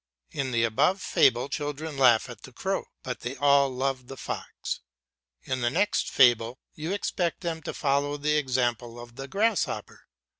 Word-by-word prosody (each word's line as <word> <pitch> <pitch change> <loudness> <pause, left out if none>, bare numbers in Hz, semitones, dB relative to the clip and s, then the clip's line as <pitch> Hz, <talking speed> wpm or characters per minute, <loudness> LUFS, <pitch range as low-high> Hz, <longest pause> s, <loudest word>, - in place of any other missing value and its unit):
In 135 -1 -2
the 115 -2 +1
above 140 - +2
fable 125 -7 +3
children 150 +1 -4
laugh 125 -4 +5
at - - -10
the - - -11
crow, - - -2 0.2
but - - -4
they 125 +3 -5
all 140 0 +4
love 130 0 -2
the 135 - -9
fox. - - -5 0.6
In 130 -1 -2
the 120 - +2
next 205 +11 +1
fable 120 -1 +4 0.2
you 155 +3 -4
expect 180 -3 -1
them 165 -2 -3
to - - -4
follow 145 0 +1
the 150 +1 +1
example 120 -4 0
of 120 0 -11
the 135 +2 -7
grasshopper. 215 +7 -1
135 Hz, 165 wpm, -27 LUFS, 125-150 Hz, 0.6 s, laugh